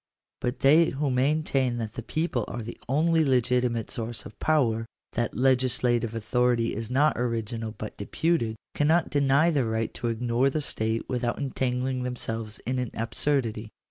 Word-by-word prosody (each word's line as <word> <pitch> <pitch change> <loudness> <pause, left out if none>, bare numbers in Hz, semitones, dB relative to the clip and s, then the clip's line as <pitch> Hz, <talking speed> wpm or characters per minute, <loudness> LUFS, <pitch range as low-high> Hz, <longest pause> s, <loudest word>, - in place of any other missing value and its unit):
But 125 +1 -3
they 155 +5 +6
who 140 0 -1
maintain 135 -1 +1
that 110 -2 -4
the - - -5
people 155 -1 -1
are 120 - -5
the 115 - -8
only 160 +4 +3
legitimate 125 -3 +1
source 115 0 -4
of - - -12
power 115 -8 +1
— - - -52
that 120 -3 -2
legis 130 -1 +2
lative 120 -2 +1
authority 120 +1 +1
is 115 +1 -4
not 140 +3 +2
original, 115 -2 -2
but 105 - -7
deputed 115 +1 0
— - - -61
cannot 160 +3 +2
deny 145 +3 +3
the 145 -5 +2
right 110 0 -1
to 120 - -3
ignore 120 +3 +1
the 155 - -1
state 110 -5 -1
without 120 -2 -1
entangling 130 -2 -1
themselves 115 -3 -3
in 125 +2 -1
an 125 -2 -2
absurdity. 115 -1 0
125 Hz, 170 wpm, -27 LUFS, 115-135 Hz, -, they